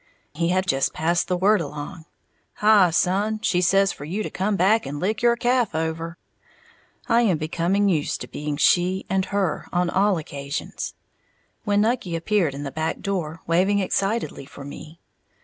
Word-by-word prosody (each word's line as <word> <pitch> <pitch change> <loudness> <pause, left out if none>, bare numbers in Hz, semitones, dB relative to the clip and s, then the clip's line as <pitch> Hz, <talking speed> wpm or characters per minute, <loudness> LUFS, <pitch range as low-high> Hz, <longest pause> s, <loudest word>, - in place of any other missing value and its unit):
He 170 +3 0
had 185 +1 +1
just 135 -6 +1
passed 170 +2 +1
the 180 0 0
word 200 +1 +3
along, 150 +3 -7 0.5
"Hi, 210 -4 +5
son, 195 +6 +1
she 180 - +2
says 195 +2 +3
for - - -9
you 185 +8 -3
to - - -5
come 200 +2 0
back 205 +4 +3
and 145 +1 -5
lick 200 +5 -1
your 235 0 +4
calf 240 -5 +1
over!" 165 +1 -3 0.9
(I 235 -1 +4
am 195 -8 +2
becoming 170 +6 0
used 160 -6 0
to - - -5
being 150 -1 -4
"she" 180 +4 +2
and 190 0 +1
"her" 195 -5 -1
on 175 -1 +1
all 195 0 +2
occasions) 140 -1 -5 0.7
when 205 -1 +2
Nucky 220 -6 0
appeared 165 -3 0
in 145 - -5
the 140 - -5
back 160 +2 -3
door, 170 -5 -3
waving 185 +5 +2
excitedly 195 - -1
for 140 - -11
me. 155 +3 -10
180 Hz, 170 wpm, -23 LUFS, 160-205 Hz, 0.9 s, Hi